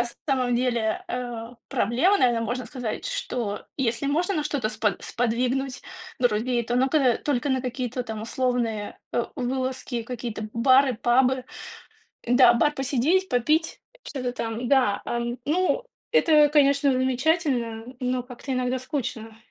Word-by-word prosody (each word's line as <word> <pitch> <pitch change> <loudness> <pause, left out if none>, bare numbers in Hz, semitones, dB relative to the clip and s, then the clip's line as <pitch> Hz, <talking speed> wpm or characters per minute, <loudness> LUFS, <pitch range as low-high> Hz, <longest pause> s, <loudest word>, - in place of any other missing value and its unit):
на 240 - +3 0.2
самом 255 -2 +1
деле, 235 -3 0
э, 240 -2 -4 0.2
проблема, 285 - +2
наверно, 240 -2 +3
можно 240 +2 -3
сказать, 245 -5 -5
что 245 - -3
если 240 -1 -1
можно 340 +7 +1
на 305 -3 -1
что-то 285 -7 -1
спо 215 0 +1
сподвигнуть 250 +3 -1 0.4
друзей, 240 0 +1
то 240 +2 -1
ну-ка 265 -1 +3
только 285 -2 0
на 260 -1 +1
какие-то 250 0 -3
там 220 -3 -6
условные, 230 -3 -2
э, 240 - +1
вылазки, 255 -1 -2
какие-то 230 -2 -5
бары, 260 +2 +4
пабы. 250 +3 +2 0.8
Да, 245 0 +6
бар 295 +6 +3
посидеть, 290 +8 +1
попить, 305 +7 +1 0.2
что-то 250 -4 -4
там. 230 0 -4
Да, 255 -7 +3
ам, 240 +1 -3
ну, 365 +10 +1 0.3
это, 305 -9 +5
конечно, 280 -1 +4
замечательно, 260 -3 0 0.2
но 250 0 -1
как-то 250 +2 -7
иногда 255 0 0
скучно. 245 -5 -5
250 Hz, 135 wpm, -25 LUFS, 235-275 Hz, 0.8 s, Да